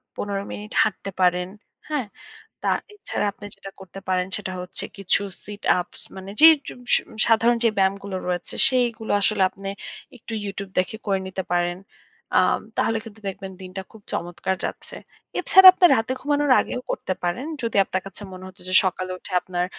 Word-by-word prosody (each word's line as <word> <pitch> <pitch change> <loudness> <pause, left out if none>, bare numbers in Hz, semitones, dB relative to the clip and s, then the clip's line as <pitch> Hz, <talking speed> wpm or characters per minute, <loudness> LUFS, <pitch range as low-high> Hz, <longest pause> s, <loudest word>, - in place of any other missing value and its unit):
১৫ 200 -1 -3
minute 210 +1 -7
হাঁটতে 200 -1 -3
পারেন। 180 0 +3 0.4
হ্যাঁ? 295 -5 -1 0.6
তা - - 0 0.3
এছাড়া 410 - -3
আপনি 205 - -14
যেটা 195 - -10
করতে 190 +1 -10
পারেন 185 -1 +1
সেটা 190 -3 -5
হচ্ছে, 180 0 -4
কিছু 195 0 +1 0.2
sit 205 0 -9 0.2
ups 175 - -4 0.2
মানে 190 +1 -8
যে 315 - +11 0.2
জু - - -6 0.2
স - - +8 0.3
সাধারণ 230 +1 +4
যে - - +6
ব্যায়ামগুলো 195 0 0
রয়েছে, 175 -1 -3
সেইগুলো 240 -3 0
আসলে 200 0 +2
আপনি 195 0 -8 0.5
একটু 230 -1 -11
YouTube 200 -1 -5
দেখে 185 +4 0
করে 195 -1 +2
নিতে 190 0 -4
পারেন। 175 0 +1 0.6
আ - - +7 0.4
তাহলে 225 0 +2
কিন্তু 220 -1 -12
দেখবেন 195 0 -6
দিনটা 185 +1 -6
খুব 220 -2 -15
চমৎকার 175 +2 -2
যাচ্ছে। - - -5 0.4
এছাড়া 380 0 +9
আপনার 360 -2 +5
রাতে 225 +3 -1
ঘুমানোর 290 0 +1
আগেও 250 - -4
করতে - - -2
পারেন। 180 +11 -2 0.2
যদি 230 -2 -2
আপনার 185 0 -3
কাছে 195 +2 -10
মনে 185 0 -9
হচ্ছে 185 0 -12
যে, 185 - -2
সকালে 185 0 -2
উঠে 190 - -11
আপনার 180 -1 -2
195 Hz, 175 wpm, -23 LUFS, 185-225 Hz, 0.6 s, যে